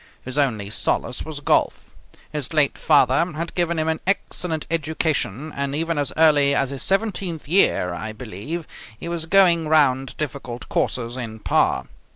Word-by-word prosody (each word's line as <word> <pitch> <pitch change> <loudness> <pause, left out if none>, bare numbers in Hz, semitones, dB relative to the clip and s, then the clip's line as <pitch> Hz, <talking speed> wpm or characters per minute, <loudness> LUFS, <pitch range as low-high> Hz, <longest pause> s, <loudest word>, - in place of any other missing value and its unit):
His 130 0 -6
only 110 -8 0
solace 120 - -1
was 155 -2 -7
golf. - - 0 0.4
His 150 0 -4
late 150 -2 +4
father 140 -1 +4
had 165 +2 -4
given 170 -1 0
him 155 0 0
an 160 0 0
excellent 180 -4 -1
education, 155 - -1
and, 140 0 -2
even 165 0 -1
as 145 - -1
early 145 -3 +5
as 135 -1 0
his 135 - -5
seventeenth 195 -6 -1
year, 150 - +3
I 85 +6 -5
believe, 120 - -6 0.3
he - - -6
was 170 -1 -3
going 170 -3 +4
round 135 -4 +2
difficult 130 -5 -5
courses 120 0 -1
in 115 -3 -5
par. 65 - +1
150 Hz, 160 wpm, -22 LUFS, 130-165 Hz, 0.4 s, early